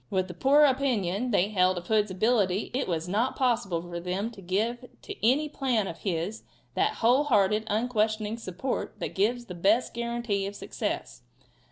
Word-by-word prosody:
With 185 -1 0
the 180 - -7
poor 275 - +4
opinion 250 -6 +1
they 200 -3 +2
held 185 -3 +2
of 175 - -5
Hood's 210 +1 +2
ability 200 0 +1
it 260 - -1
was 165 -2 -2
not 215 +8 0
possible 225 -10 0
for 175 0 -6
them 185 +6 -3
to 210 -4 -12
give 215 +7 -1 0.2
to 405 - -7
any 270 +7 +3
plan 255 -7 0
of 165 - -7
his 190 +3 -3 0.3
that - - +1
whole 260 +5 +5
hearted, 210 -4 +2
unquestioning 215 -1 0
support 225 +4 -4
that - - -4
gives 240 +5 0
the 185 - -8
best 200 +8 +2
guarantee 235 -4 -2
of 200 - -7
success. - - -4
215 Hz, 175 wpm, -28 LUFS, 185-240 Hz, 0.3 s, whole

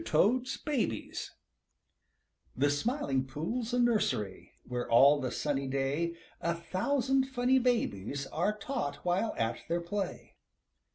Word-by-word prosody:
TOAD'S 255 0 +2
BABIES 235 - -2 1.3
The 145 +2 +3
Smiling 145 - 0
Pool's 220 - -3
a 245 - +1
nursery 215 - +1
Where 125 -1 -3
all 140 +5 +6
the 130 - -1
sunny 140 -1 -1
day 140 +5 -1 0.3
A 170 0 0
thousand 265 +10 +1
funny 260 0 +2
babies 140 - 0
Are 180 +9 -1
taught 225 - -3
while 190 +5 +1
at 115 +1 0
their 170 - +1
play. 190 +2 -4
170 Hz, 120 wpm, -31 LUFS, -, 1.3 s, all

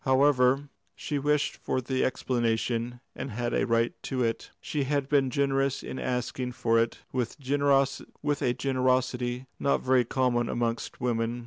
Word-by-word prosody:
However, 135 0 +4 0.3
she 145 - -3
wished 150 +1 +1
for - - -1
the 130 +1 -1
explanation 120 -1 -1
and 135 - -5
had 120 +1 -2
a - - +1
right 115 0 +2
to 130 -2 -1
it; 115 -1 -2
she 145 -3 -2
had 140 0 0
been 140 -2 +3
generous 135 0 +1
in 130 - -5
asking 125 0 -2
for 115 -1 +2
it, 115 0 0 0.2
with 125 -3 -2 1.0
a 120 - +2
generosity 130 -1 0
not 140 - +2
very 130 -1 +4
common 120 -1 +1
amongst 120 -1 -2
women. 120 -1 0
125 Hz, 145 wpm, -28 LUFS, 120-135 Hz, 1.0 s, However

